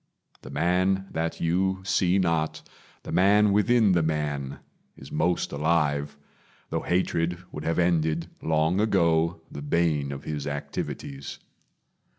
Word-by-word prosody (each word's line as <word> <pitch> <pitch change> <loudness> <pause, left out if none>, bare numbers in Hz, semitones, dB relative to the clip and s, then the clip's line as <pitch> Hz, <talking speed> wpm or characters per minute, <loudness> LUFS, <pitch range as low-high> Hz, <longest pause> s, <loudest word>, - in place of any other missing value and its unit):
The - - -10
man 95 +2 +1
that 80 +1 -2
you 95 +3 0
see 90 -1 +2
not 85 -4 0 0.4
The - - -7
man 100 +3 +4
within 105 +1 +4
the 85 -2 +3
man 75 -3 -2 0.4
is 65 - -12
most 85 +3 0
alive; 75 -2 0 0.5
Though - - -1
hatred 85 -1 0
would 75 - -7
have 80 - 0
ended, 85 -2 +1
long 80 +3 +1
ago, 85 -6 +2
The 70 - -7
bane 75 -2 +1
of 70 -1 -7
his 75 -2 -4
activities. 70 -1 -5
85 Hz, 130 wpm, -26 LUFS, 75-90 Hz, 0.5 s, man